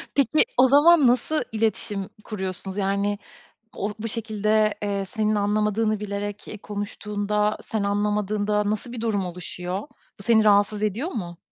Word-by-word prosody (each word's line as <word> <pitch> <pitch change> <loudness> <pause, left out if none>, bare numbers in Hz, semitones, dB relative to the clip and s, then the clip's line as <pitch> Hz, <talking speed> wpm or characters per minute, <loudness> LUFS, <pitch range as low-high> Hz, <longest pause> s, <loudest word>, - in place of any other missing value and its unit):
Peki, 285 - +4
o 260 - +7
zaman 290 +1 +6
nasıl 255 +6 +2
iletişim 215 -2 -1
kuruyorsunuz? 190 -2 -4
Yani, 200 +1 0 0.6
o, 200 - -2
bu 225 +1 -4
şekilde, 215 -1 +1
eee, 200 -1 -1
senin 215 0 0
anlamadığını 210 +1 +1
bilerek, 205 0 -5
eee, 215 - -7
konuştuğunda, 210 0 -2
sen 220 -2 -2
anlamadığında 210 0 0
nasıl 215 +3 -3
bir 240 - -6
durum 210 -4 0
oluşuyor? 180 +1 -5 0.4
Bu - - -7
seni 220 0 +4
rahatsız 205 0 +3
ediyor 215 - -1
mu? 175 -7 -5
210 Hz, 140 wpm, -24 LUFS, 200-220 Hz, 0.6 s, o